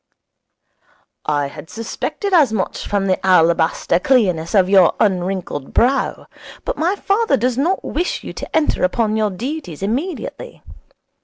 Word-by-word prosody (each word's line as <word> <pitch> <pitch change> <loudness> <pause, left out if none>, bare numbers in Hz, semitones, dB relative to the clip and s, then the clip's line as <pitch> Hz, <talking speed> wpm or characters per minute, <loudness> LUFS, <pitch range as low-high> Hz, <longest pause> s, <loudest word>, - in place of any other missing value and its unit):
'I 145 -1 +1
had 150 +2 -11
suspected 300 - -4
as 300 -10 +5
much 205 -4 -3
from 200 -1 0
the 185 -1 0
alabaster 170 -2 +3
clearness 185 -8 +1
of 190 -2 +5
your 190 -3 +5
unwrinkled 185 -7 -1
brow. 260 +4 +1 0.4
But - - -2
my 345 +5 0
father 415 +3 +1
does 245 +2 0
not 330 +9 0
wish 350 +4 -2
you - - -7
to - - -7
enter 315 -1 +1
upon 215 +3 +1
your 215 -1 +1
duties 220 - -6
immediately. 320 - -4
215 Hz, 140 wpm, -19 LUFS, 180-290 Hz, 0.4 s, as